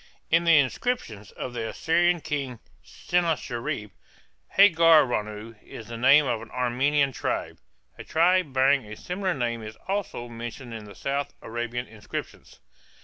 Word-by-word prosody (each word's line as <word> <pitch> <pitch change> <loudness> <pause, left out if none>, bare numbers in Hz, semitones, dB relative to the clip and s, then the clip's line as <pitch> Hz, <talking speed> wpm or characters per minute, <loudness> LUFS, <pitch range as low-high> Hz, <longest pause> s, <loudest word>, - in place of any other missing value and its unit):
In 165 +1 +4
the 165 -2 +6
inscriptions 130 - -1
of 125 - -6
the 115 -2 -3
Assyrian 175 +1 +2
king 135 -5 -3 0.3
Sennacherib, 135 - -2 0.7
Hargaranu 150 - +4
is 110 - -10
the 120 - -6
name 135 +5 +6
of 115 -4 -1
an - - -11
Aramean 135 +3 +1
tribe. - - -3 0.4
A - - -6
tribe 175 -1 +2
bearing 135 +1 +3
a 105 - -8
similar 185 - -3
name 120 -3 -2
is 110 0 -9
also 195 -10 -3
mentioned 120 +1 -8
in 110 -2 -7
the 100 -1 -12
south 140 - -3
Arabian 120 +1 -4
inscriptions. 110 -3 -8
130 Hz, 140 wpm, -26 LUFS, 115-165 Hz, 0.7 s, the